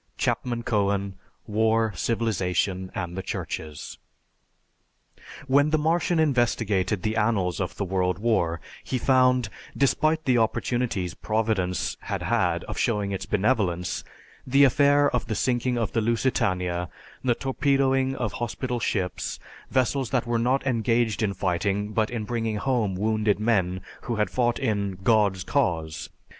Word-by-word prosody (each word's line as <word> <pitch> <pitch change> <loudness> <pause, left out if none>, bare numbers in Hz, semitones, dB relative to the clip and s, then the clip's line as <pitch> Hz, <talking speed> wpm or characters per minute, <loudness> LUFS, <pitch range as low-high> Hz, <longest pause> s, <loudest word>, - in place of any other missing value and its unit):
(Chapman 120 -1 -1
Cohen: 100 -3 0 0.3
"War, 110 0 +1
Civilization 95 -3 -1
and 85 0 -4
the 95 - -3
Churches.") 75 -5 -6 1.5
When 140 +2 +4
the 155 - +2
Martian 165 +3 +1
investigated 115 - +1
the 110 0 0
annals 105 -5 +1
of 90 - -3
the 100 - -1
World 90 -1 0
War 95 -7 +1 0.2
he 130 - -2
found, 125 -2 +3 0.3
despite 155 +3 +2
the 125 -2 +3
opportunities 115 -4 -1
Providence 105 -5 -1
had - - -4
had - - +1
of - - -6
showing 105 -3 0
its 95 - -4
benevolence, 95 -5 0 0.4
the 135 +2 +5
affair 145 +2 +5
of 125 - -1
the 110 - -2
sinking 125 +1 0
of 115 -3 -1
the 115 - 0
Lusitania, 90 -7 0 0.3
the 125 -2 +2
torpedoing 135 0 +1
of 120 -6 -2
hospital 120 +2 -3
ships, 95 -5 -2 0.3
vessels 130 0 +1
that 125 -2 0
were 120 -1 0
not 130 +4 +1
engaged 115 -3 +1
in 100 -3 0
fighting 100 +3 -1
but 110 -1 +1
in 120 -3 -3
bringing 115 -1 -2
home 105 -3 0
wounded 105 +1 +1
men 95 -5 +1 0.2
who 120 - -1
had 105 -1 0
fought 120 -1 +1
in 100 -7 -1
"God's 100 -4 +3
Cause." 80 - -1
110 Hz, 140 wpm, -25 LUFS, 95-125 Hz, 1.5 s, the